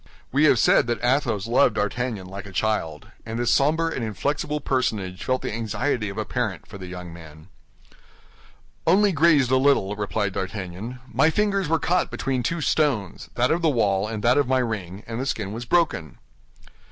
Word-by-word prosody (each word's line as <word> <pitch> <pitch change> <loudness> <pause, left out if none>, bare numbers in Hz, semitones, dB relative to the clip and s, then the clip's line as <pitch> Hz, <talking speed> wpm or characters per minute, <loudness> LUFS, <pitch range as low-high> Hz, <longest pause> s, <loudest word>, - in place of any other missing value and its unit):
We 145 +4 +3
have 140 - +5
said 115 - +4
that 120 0 -2
Athos 120 -6 +1
loved 120 +4 +3
D'Artagnan 105 -1 -2
like 100 +1 -8
a - - -10
child, 85 -6 -2
and 110 +1 -5
this 120 -1 +2
somber 160 +4 +2
and 135 -7 -3
inflexible 145 +7 -2
personage 110 -9 -2
felt 130 0 -1
the - - -3
anxiety 115 +1 -1
of 100 - -8
a 110 - -2
parent 110 -9 -3
for 100 -2 -11
the 95 - -8
young 90 -1 -8
man. 80 0 -13 1.4
"Only 200 +4 +5
grazed 155 -6 +4
a 130 - +5
little," 130 -7 +2
replied 105 -1 -2
D'Artagnan; 95 +5 -5
"my 155 - +3
fingers 200 -1 0
were 165 - +3
caught 180 +3 0
between 130 -2 -2
two 170 +6 -2
stones—that 125 - 0
of 170 - +1
the 165 - +3
wall 105 -6 +1
and 105 -1 -5
that 125 +4 +4
of 140 - +1
my 130 0 +2
ring—and 110 -1 -4
the - - -2
skin 105 -6 -3
was 120 +2 -6
broken." 150 - 0
115 Hz, 180 wpm, -24 LUFS, 100-140 Hz, 1.4 s, have